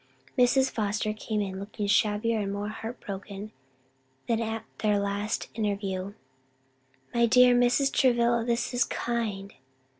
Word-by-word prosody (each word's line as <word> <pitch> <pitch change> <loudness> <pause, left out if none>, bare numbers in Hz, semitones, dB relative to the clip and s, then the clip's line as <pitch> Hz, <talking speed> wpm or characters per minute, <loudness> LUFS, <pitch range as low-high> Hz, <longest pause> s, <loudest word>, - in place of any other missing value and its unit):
Mrs. 260 +2 +4
Foster 210 0 -1
came 215 -1 -2
in 190 -1 -5
looking 205 +1 -5
shabbier 210 +2 +2
and 200 -1 -2
more 205 +1 -3
heart 225 +3 -7
broken 200 +1 -7 0.8
than 230 -1 +1
at 225 0 -3
their 210 -1 +2
last 200 +1 -2
interview. 200 -3 -2 1.0
"My 235 0 +4
dear 250 +1 +6
Mrs. 245 +3 +3
Travilla, 235 -2 +3
this 235 +1 -1
is 245 - +3
kind!" 215 -5 -3
215 Hz, 130 wpm, -28 LUFS, 200-235 Hz, 1.0 s, dear